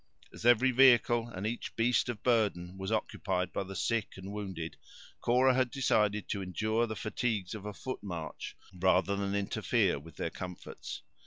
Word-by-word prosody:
As 115 - -2
every 120 +2 +6
vehicle 120 -2 +5
and 100 -4 -6
each 115 +2 -3
beast 120 +2 +2
of 115 -4 -4
burden 100 -7 +1
was 95 +2 -4
occupied 90 -4 -1
by - - -1
the 95 0 -8
sick 115 -2 -1
and 95 +1 -7
wounded, 95 -6 -5 0.4
Cora 130 +2 +4
had 130 -1 +2
decided 105 -6 +1
to 100 - -1
endure 110 +5 0
the 110 - -4
fatigues 110 -3 -2
of 105 -1 -6
a 105 - -5
foot 130 -1 -5
march, 85 -6 -6 0.2
rather 95 +1 +2
than 100 0 -1
interfere 100 -7 +1
with 80 +1 -13
their - - -3
comforts. 90 -1 -7
105 Hz, 170 wpm, -32 LUFS, 95-120 Hz, 0.4 s, every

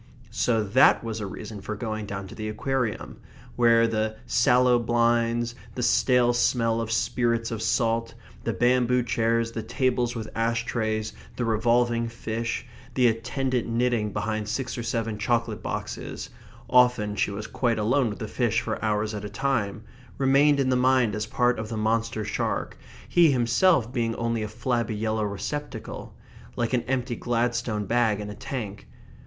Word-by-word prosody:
So 115 -3 +1
that 105 +6 +5
was 115 -1 -4
a 105 - -4
reason 105 +2 -8
for 110 - -4
going 110 -1 -4
down 100 -1 -4
into 95 - -10
the 110 -1 -5
Aquarium, 125 +1 -2 0.4
where 115 -1 +5
the 110 -1 -1
sallow 125 0 +4
blinds, 120 0 +1 0.2
the 125 - -2
stale 125 0 +3
smell 115 -1 +2
of 115 0 -4
spirits 115 0 0
of 115 -1 -3
salt, 115 -1 0 0.3
the 115 - 0
bamboo 125 +3 +2
chairs, 115 0 +1
the 115 - -4
tables 125 +1 0
with 110 -2 -4
ash 115 0 0
trays, 110 -2 -2 0.2
the 120 - -1
revolving 115 +1 +2
fish, 115 0 -4 0.3
the 125 - +3
attendant 120 +2 0
knitting 115 -2 0
behind 105 +1 -2
six 125 +3 -2
or 120 - -4
seven 115 -2 -2
chocolate 115 +1 0
boxes - - -5 0.4
(often 125 -5 +3
she 100 - +1
was 100 +2 -5
quite 120 -3 0
alone 120 +4 +2
with 105 - -6
the - - -5
fish - - +1
for - - -4
hours 105 0 0
at 105 -1 -5
a 105 - -5
time) 110 -2 -1 0.3
remained 140 +2 +4
in 135 -1 +2
the 130 - +3
mind 125 -3 +3
as 105 +1 -3
part 125 +2 +1
of 110 - -5
the 115 - -4
monster 110 0 0
shark, - - -2 0.3
he 170 -2 +5
himself 125 +1 +3
being 115 -2 0
only 115 -1 -1
a 105 - -2
flabby 115 0 -1
yellow 110 +1 -1
receptacle, 125 +9 -5 0.4
like 120 +1 -1
an 125 - +3
empty 125 -1 -1
Gladstone 115 -3 -1
bag 115 -2 +2
in 105 0 -5
a - - -8
tank. 105 -5 -6
115 Hz, 165 wpm, -26 LUFS, 110-125 Hz, 0.4 s, that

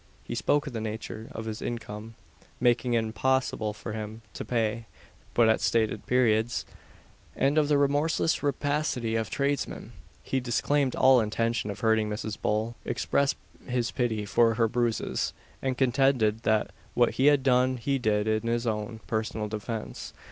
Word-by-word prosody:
He - - -6
spoke 145 0 +1
of 140 - -6
the 110 - -3
nature 110 0 -5
of 110 - -7
his 110 -1 -5
income 115 -1 -6 0.4
making 120 0 +2
it 115 - +2
impossible 110 -1 0
for 105 +1 -7
him 110 +1 -6
to - - -5
pay 115 -1 -1 0.5
but 120 -1 +5
at 110 - +3
stated 110 -2 +1
periods; 120 -2 +2 0.7
and 140 +2 +2
of 155 -2 +3
the 145 -1 +3
remorseless 145 +3 +2
rapacity 145 -5 0
of 110 -2 -1
tradesmen. 140 -3 -2 0.3
He 135 - -1
disclaimed 130 +2 +1
all 130 -2 +6
intention 115 0 -1
of 100 - -6
hurting 110 -1 +2
Mrs. 105 0 -4
Bull, 110 +2 0
expressed 140 0 0 0.3
his 120 -2 -1
pity 110 -5 -1
for 115 +2 +3
her 115 0 +3
bruises, 120 -1 -1 0.3
and 130 -2 -1
contended 125 -4 +2
that 110 -2 +1 0.2
what 120 -1 +4
he 135 - +2
had 145 -2 +5
done 130 0 +3
he 135 +3 -1
did 105 -2 +1
in 110 +1 0
his 120 +1 0
own 110 0 -3
personal 110 -1 -2
defence. 110 +1 -5
115 Hz, 160 wpm, -28 LUFS, 110-130 Hz, 0.7 s, all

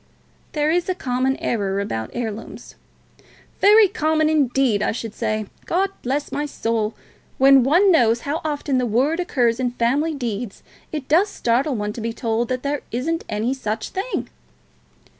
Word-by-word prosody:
"There 300 0 +1
is 350 +2 0
a 370 - 0
common 260 -3 0
error 200 -4 -1
about 110 - -3
heirlooms." 225 -2 -6 0.9
"Very 420 +1 +7
common, 315 -6 +1
indeed, 270 -7 +2
I - - +1
should 225 -2 -5
say. 215 -2 -2 0.2
God 385 +3 +1
bless 280 +4 -2
my 295 +1 -2
soul! 225 -5 -2 0.4
when 270 0 +7
one 345 +10 +4
knows 235 -7 +3
how 295 +3 -3
often 290 -3 -1
the 250 - 0
word 265 +10 +1
occurs 245 -9 +1
in 245 -1 -1
family 280 +7 +1
deeds, 235 -5 -4 0.3
it 300 -4 -5
does 360 +7 +4
startle 260 -1 0
one 210 -1 -3
to 230 - -7
be 230 +1 -3
told 230 0 -1
that 255 -1 -2
there 285 0 -1
isn't 320 +8 -2
any 220 +4 -1
such 220 -4 -4
thing." 400 +6 -3
255 Hz, 160 wpm, -22 LUFS, 230-310 Hz, 0.9 s, Very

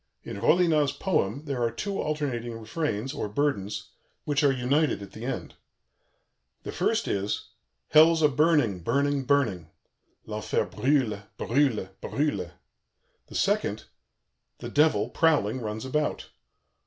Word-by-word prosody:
In 100 - -7
Rollinat's 155 -5 +3
poem 145 - -1
there 135 -4 -3
are 115 - +2
two 195 - -3
alternating 135 -6 -2
refrains, 115 +1 -3
or 105 - -3
burdens, 105 -5 -1 0.3
which 145 0 0
are 140 - +5
united 135 +4 +1
at 100 - -11
the 110 +2 -8
end. 135 - -4 1.1
The - - -5
first - - 0
is: 100 +1 -2 0.4
"Hell's 160 +1 +6
a - - +8
burning, 145 - +2
burning, 140 +8 0
burning." 115 - +1 0.6
(L'enfer - - -1
brûle, 125 -7 0
brûle, 120 -7 +1
brûle.) 120 - -1 0.8
the - - -12
second: - - 0 0.7
"The - - -7
Devil, 145 -9 +3
prowling, 130 -7 +2
runs 110 +1 -4
about." 150 +3 -2
135 Hz, 125 wpm, -27 LUFS, 110-150 Hz, 1.1 s, a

